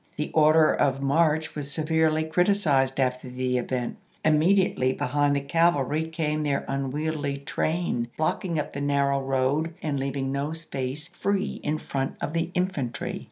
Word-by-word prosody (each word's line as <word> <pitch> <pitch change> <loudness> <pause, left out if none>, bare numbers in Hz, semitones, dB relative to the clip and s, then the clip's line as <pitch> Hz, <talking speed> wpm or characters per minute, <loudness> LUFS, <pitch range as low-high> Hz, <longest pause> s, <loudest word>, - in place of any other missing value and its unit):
The 150 - -3
order 155 0 +5
of 135 -2 +1
march 155 +2 +2
was 145 -2 -5
severely 160 +1 +1
criticized 160 -6 +2
after 125 -1 0
the 125 0 -1
event. 125 0 -3 0.3
Im 155 -1 +5
mediately 175 -7 +3
behind 145 +2 +1
the 140 - 0
cavalry 155 0 +2
came 155 -2 -1
their 145 -2 -1
unwieldy 145 +1 -2
train, 140 -3 -1
blocking 165 +2 -1
up 150 - -3
the 145 - -4
narrow 140 -1 +1
road 135 +5 0
and 145 -3 -1
leaving 135 0 -2
no 140 +3 -2
space 150 -2 -5
free 195 +2 -2
in 150 +1 -1
front 135 -3 -3
of 150 - -3
the 165 0 0
infantry. 180 -10 -2
150 Hz, 155 wpm, -26 LUFS, 135-160 Hz, 0.3 s, order